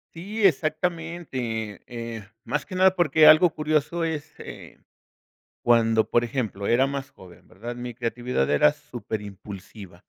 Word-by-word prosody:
Sí, 205 +6 -5
exactamente, 155 - -1
eh, 115 -2 -6 0.2
más 150 - -3
que 185 - -7
nada 190 0 +4
porque 155 -3 +4
algo 155 +3 +8
curioso 155 +2 -1
es, 160 -1 -3
eh, - - -10 0.9
cuando, 115 -2 +3
por 120 - +3
ejemplo, 115 -5 -3
era 130 +3 +4
más 140 0 -5
joven, 90 -2 -16
¿verdad? 115 +6 -7
Mi 120 0 -6
creatividad 120 - -2
era 75 - +5
superimpulsiva. 100 -2 -9
125 Hz, 130 wpm, -25 LUFS, 110-155 Hz, 0.9 s, algo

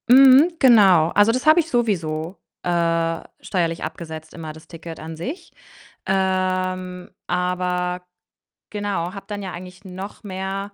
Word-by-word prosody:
Mhm, 270 +6 +7
genau. 195 -10 +6
Also, 205 +5 +4
das 255 +4 -2
habe 310 +2 +6
ich 330 -1 -1
sowieso, 175 - -1 0.3
äh, 165 -1 0 0.2
steuerlich 170 -3 -2
abgesetzt 160 -1 -7
immer, 160 -2 -7
das 160 0 -15
Ticket 165 -1 -9
an 160 +1 -7
sich. 280 - -7 0.5
Ähm, 185 -1 -1 0.2
aber, 180 0 -1 0.7
genau, 200 -4 -3
habe 195 - -9
dann 205 -1 -5
ja 190 - -5
eigentlich 185 +2 -10
noch 190 +3 -8
mehr 195 +1 -5
185 Hz, 135 wpm, -22 LUFS, 170-205 Hz, 0.7 s, Mhm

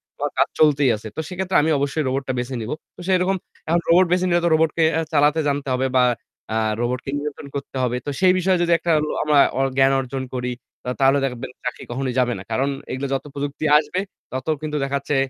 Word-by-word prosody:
তো - - -43
আমার - - -1
কাজ - - +5
চলতেই 145 -3 +4
আছে। 110 +1 -8
তো - - -5
সেক্ষেত্রে 185 0 0
আমি 160 +2 +1
অবশ্যই 145 +2 0
রোবটটা 130 0 -1
বেছে 125 +1 -3
নিবো। 115 +7 -3 0.2
তো - - -18
সেরকম 185 +1 +2 0.3
এখন 170 +1 +2
রোবট 180 +2 +6
বেছে 180 0 +2
নিলে 175 0 +3
তো - - +4
রোবটকে 160 +1 +2
অ্যা 165 0 +1
চালাতে 150 +2 +4
জানতে 140 0 -2
হবে 130 +1 +1
বা 125 - +5 0.5
আ - - +1 0.2
রোবটকে 125 +2 -2
নিয়ন্ত্রণ 150 0 -6
করতে 140 -1 -6
হবে। 125 0 0
তো - - -2
সেই 185 -1 +5
বিষয়ে 185 0 +2
যদি 170 - +1
একটা 170 - 0 0.2
ল - - -4
আমা 150 -1 +3 0.2
ওর 135 0 +2
জ্ঞান 135 0 +5
অর্জন 130 0 -4
করি 125 0 -2 0.3
তা - - -4
তাহলে 135 +1 +5
দেখবেন 125 -2 -5
চাকরি 125 - -4
কখনোই 130 0 -2
যাবে 125 -1 +2
না। 95 - -8
কারণ 135 +5 +1 0.2
এগুলো 135 +2 -3
যত 135 - -2
প্রযুক্তি 145 +2 -4
আসবে 155 +4 -1 0.3
তত 130 +3 -5
কিন্তু 150 -1 -3
দেখাচ্ছে 140 +1 -1
140 Hz, 220 wpm, -22 LUFS, 130-160 Hz, 0.5 s, রোবট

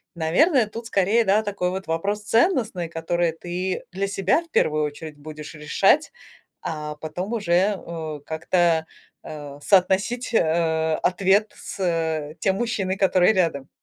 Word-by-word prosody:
наверное, 225 - +3
тут 225 +2 -8
скорее, 210 +3 +2
да, 210 +2 +3
такой 200 -3 -2
вот 190 -1 -5
вопрос 200 +6 -1
ценностный, 225 - +1
который 170 0 -1
ты 180 +3 -4
для 195 +2 -2
себя 195 - +1
в 335 - -23
первую 155 - +2
очередь 150 +1 -7
будешь 150 +1 -9
решать, 195 - +2 0.5
а 150 -1 -5
потом 175 +8 -5
уже, 205 -6 -3
э, 170 -5 -1
как-то, 165 0 +1 0.4
а, 145 -2 -8
соотносить, 200 +7 +2
э, 160 -3 +2
ответ 195 +3 +2
с, 200 - -9
э, 160 -3 -1
тем 190 +2 +1
мужчиной, 200 -5 -1
который 190 +1 +4
рядом. 165 -8 0
180 Hz, 140 wpm, -23 LUFS, 160-205 Hz, 0.5 s, который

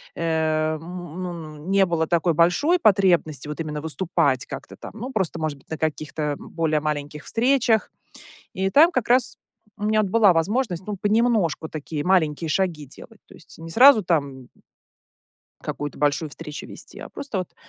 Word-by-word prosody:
м, - - -6
н 160 +2 -2
ну, 160 -4 -8
не 195 0 +4
было 165 -2 -1
такой 170 0 +2
большой 180 - +3
потребности 180 - +2
вот 150 +1 -6
именно 150 -2 -4
выступать 160 -4 0
как-то - - -8
там. - - -9
Ну, 240 +4 -6
просто, 190 -8 -2
может 155 -2 -3
быть, - - -28
на 160 - -4
каких-то 155 -1 -2
более 160 -2 -1
маленьких 150 0 -4
встречах. 235 -2 +1 0.6
И 190 +1 -1
там 320 - +6
как 255 -8 -1
раз 250 0 +2 0.4
у 205 - -4
меня 215 0 +3
вот 200 -3 -3
была 210 -4 +5
возможность, 185 +1 -1
ну, 205 -1 -4
понемножку 205 -6 +1
такие 150 -1 -5
маленькие 165 -3 +1
шаги 165 -4 -1
делать. 135 - -15
То - - -16
есть - - -17
не 165 0 -9
сразу 245 +1 +7
там 140 -7 -2 1.1
какую-то 145 -1 -5
большую 150 +2 +1
встречу 150 +1 -8
вести, - - -12
а - - -8
просто 275 -9 -5
вот 180 - -7
170 Hz, 165 wpm, -23 LUFS, 155-205 Hz, 1.1 s, сразу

